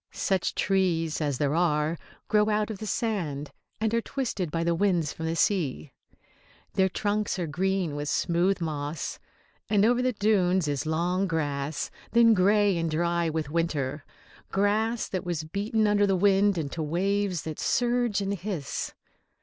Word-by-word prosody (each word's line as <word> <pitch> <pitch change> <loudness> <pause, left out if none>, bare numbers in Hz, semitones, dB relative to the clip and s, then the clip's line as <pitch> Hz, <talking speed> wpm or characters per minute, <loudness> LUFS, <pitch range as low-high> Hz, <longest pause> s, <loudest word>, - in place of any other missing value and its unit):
Such 190 -3 -1
trees 170 -5 +1
as 145 -4 0
there 145 +1 0
are 155 -2 +1 0.3
grow 210 0 +3
out 215 +1 0
of 205 - -7
the 215 - -5
sand, 165 -12 -2 0.3
and 220 +1 0
are 230 - +2
twisted 230 - -3
by 165 +2 -1
the 170 0 +2
winds 170 -4 +1
from 160 - -5
the 165 - -1
sea. 160 -7 0 0.8
Their 190 0 +3
trunks 205 +1 -1
are 175 - -1
green 180 0 -1
with 145 0 -3
smooth 175 +2 +1
moss. 150 -1 -3 0.5
And 205 -1 +4
over 245 +2 +3
the 255 0 +1
dunes 190 -5 +2
is 145 +1 -2
long 175 +4 0
grass, 145 -3 -2 0.2
then 230 -1 +6
grey 200 -1 +3
and 165 0 -1
dry 170 +1 0
with 155 -2 -3
winter, 150 -4 -1 0.5
grass 215 +4 +1
that 185 - -3
was 170 -3 -2
beaten 210 +7 0
under 205 -1 +3
the 195 - +2
wind 200 +1 +3
into 160 +1 -3
waves 185 +3 0
that 155 -2 -6
surge 240 -4 +1
and 200 0 -1
hiss. 185 -6 -4
180 Hz, 160 wpm, -27 LUFS, 160-205 Hz, 0.8 s, then